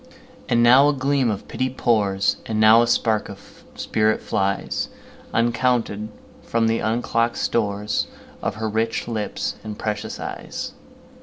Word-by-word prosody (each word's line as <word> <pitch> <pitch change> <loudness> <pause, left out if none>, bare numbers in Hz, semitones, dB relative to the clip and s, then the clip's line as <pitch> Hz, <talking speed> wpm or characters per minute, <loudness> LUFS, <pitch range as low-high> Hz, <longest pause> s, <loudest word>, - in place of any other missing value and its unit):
And 120 -2 +4
now 130 +4 +7
a - - +2
gleam 135 -2 +1
of 100 -2 -4
pity 130 0 -1
pours, 105 -6 +1
And 110 -1 -1
now 110 +1 +7
a 120 - +2
spark 110 -2 +1
of - - -13
spirit 110 0 +1
flies, 100 -1 -1 0.4
Uncounted, 115 -2 +1 0.3
from 115 -1 0
the 115 0 +1
unlock'd 115 +1 0
storesOf 105 -3 -2
her 110 0 -3
rich 110 +1 -1
lips 110 -3 -3
and 105 -1 -6
precious 105 -1 -4
eyes. - - -6
115 Hz, 135 wpm, -22 LUFS, 105-120 Hz, 0.4 s, now